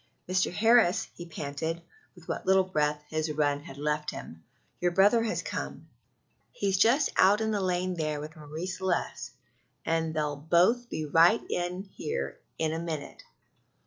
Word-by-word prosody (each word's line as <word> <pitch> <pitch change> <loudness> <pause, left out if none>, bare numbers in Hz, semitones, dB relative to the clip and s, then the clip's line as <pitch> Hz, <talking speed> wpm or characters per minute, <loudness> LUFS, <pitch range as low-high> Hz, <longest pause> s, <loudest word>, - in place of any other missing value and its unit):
"Mr. 185 0 +1
Harris," 225 -1 +4
he 175 - -9
panted, 155 +1 -4 0.4
with 175 -2 -16
what - - -4
little 190 0 +5
breath 150 -5 0
his 155 0 -1
run 145 -1 +1
had 140 -1 -11
left 150 +1 -1
him, 80 0 -9 0.4
"your 175 - +2
brother 200 +6 +4
has 225 -1 -1
come - - -5 0.6
he's 195 -2 0
just 255 +8 +4
out 200 +3 +6
in 220 0 0
the 205 -2 0
lane 185 0 0
there 155 -3 -2
with 155 +2 -8
Marie 155 +2 -6
Celeste, 190 -1 -2 0.6
and 165 0 0
they'll 150 -1 0
both 180 +11 +3
be 155 - -3
right 165 +8 +5
in 180 +2 -2
here 440 - -5 0.2
in 160 -1 0
a 165 - -2
minute." 160 -4 -5
170 Hz, 160 wpm, -29 LUFS, 155-190 Hz, 0.6 s, out